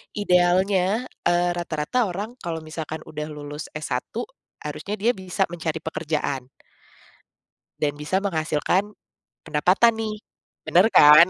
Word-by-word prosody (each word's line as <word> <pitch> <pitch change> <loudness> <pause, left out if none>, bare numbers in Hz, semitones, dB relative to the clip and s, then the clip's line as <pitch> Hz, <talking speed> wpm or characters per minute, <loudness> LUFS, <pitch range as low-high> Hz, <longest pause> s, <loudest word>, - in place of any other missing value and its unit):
idealnya, 190 +3 +3 0.2
eee, 175 0 +3
rata-rata 170 +8 0
orang, 205 +7 -5
kalau 165 -1 -4
misalkan 155 0 -5
udah 150 0 -4
lulus 150 0 -7
S1 150 -5 -2 0.6
harusnya 155 +7 -4
dia 235 +3 +4
bisa 190 +1 0
mencari 160 -2 -2
pekerjaan 150 -4 -2 1.3
dan 150 -1 +1
bisa 150 +5 0
menghasilkan 175 +2 +1 0.6
pendapatan 180 +9 +4
nih. 220 -1 -3 0.5
Bener 180 +4 +5
kan? 150 +3 +10
170 Hz, 110 wpm, -24 LUFS, 150-195 Hz, 1.3 s, kan